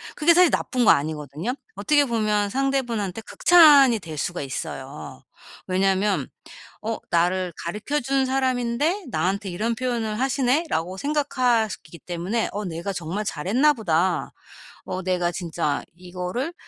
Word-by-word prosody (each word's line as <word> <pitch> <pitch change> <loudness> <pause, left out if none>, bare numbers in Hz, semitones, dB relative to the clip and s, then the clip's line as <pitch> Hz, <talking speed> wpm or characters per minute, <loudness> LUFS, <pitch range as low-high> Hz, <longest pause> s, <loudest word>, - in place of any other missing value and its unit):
그게 335 +3 +4
사실 360 -1 +5
나쁜 250 -2 0
거 - - +8
아니거든요. 150 - -2 0.2
어떻게 290 -2 +3
보면 215 -4 0
상대분한테 240 -7 -1
극찬이 285 -3 +6
될 160 -4 -8
수가 175 +4 -3
있어요. 130 -3 -7 0.4
왜냐면 195 +2 +1 0.6
어 225 +1 -3
'나를 180 +1 +1
가르쳐 210 +12 -2
준 270 +1 +1
사람인데 260 - 0
나한테 190 +4 -1
이런 220 +6 -1
표현을 230 -3 -2
하시네.'라고 260 - 0
생각하시기 245 - 0
때문에 180 +8 -2
어 210 +1 -4
'내가 175 +2 -4
정말 180 +5 -4
잘했나 250 - +2
보다. 180 -5 0 0.5
어 185 - -4
내가 180 -1 0
진짜 165 -4 -2
이거를' 180 - -5
210 Hz, 300 characters per minute, -23 LUFS, 180-260 Hz, 0.6 s, 거